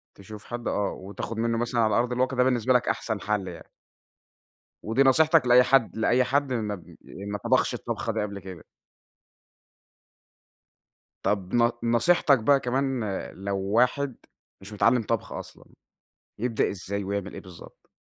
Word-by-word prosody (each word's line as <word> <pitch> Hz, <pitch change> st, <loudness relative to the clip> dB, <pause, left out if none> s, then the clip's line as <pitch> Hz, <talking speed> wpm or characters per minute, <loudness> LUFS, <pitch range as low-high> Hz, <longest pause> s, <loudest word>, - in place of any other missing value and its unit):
تشوف 105 Hz, +2 st, -11 dB
حد 120 Hz, 0 st, -6 dB
آه، 100 Hz, -1 st, 0 dB
وتاخذ 100 Hz, +4 st, -7 dB
مِنُّه 115 Hz, 0 st, 0 dB
مثلًا 120 Hz, 0 st, 0 dB
على 110 Hz, -2 st, +2 dB
أرض 120 Hz, +1 st, +1 dB
الواقع، 130 Hz, +1 st, 0 dB
ده 125 Hz, -, +5 dB
بالنسبة 125 Hz, -1 st, +2 dB
لك 125 Hz, -, +2 dB
أحسَن 110 Hz, -2 st, -2 dB
حَل 105 Hz, -2 st, -1 dB
يعني. 85 Hz, -2 st, -10 dB, 1.1 s
ودي 115 Hz, +5 st, +2 dB
نصيحتك 155 Hz, +2 st, +4 dB
لأي 125 Hz, +1 st, +7 dB
حد 125 Hz, -4 st, +2 dB
لأي 120 Hz, +3 st, +3 dB
حد 135 Hz, +1 st, 0 dB
ما 105 Hz, -4 st, -2 dB
ب 90 Hz, -, -15 dB
ما 100 Hz, +1 st, -6 dB
طبَخش -, -, +1 dB
الطبخة -, -, -3 dB
دي -, -, -1 dB
قبْل 100 Hz, -1 st, -4 dB
كده. 95 Hz, -3 st, -10 dB, 2.6 s
طَب 95 Hz, -3 st, -1 dB
ن 120 Hz, 0 st, +4 dB
نصيحتك 135 Hz, +4 st, +3 dB
بقى 135 Hz, +5 st, +4 dB
كمان 130 Hz, -1 st, -1 dB
آآ، 100 Hz, -3 st, -4 dB
لو 100 Hz, +1 st, -3 dB
واحد 125 Hz, +7 st, +1 dB, 0.5 s
مش 100 Hz, +2 st, -11 dB
متعلِّم 115 Hz, +3 st, +3 dB
طبْخ 115 Hz, +1 st, -2 dB
أصلًا، -, -, -9 dB, 0.7 s
يبدأ 115 Hz, 0 st, 0 dB
إزاي 100 Hz, +1 st, -4 dB
ويعمل 100 Hz, 0 st, -4 dB
إيه -, -, -7 dB
بالضبط؟ 90 Hz, -3 st, -15 dB
115 Hz, 155 wpm, -26 LUFS, 100-125 Hz, 2.6 s, لأي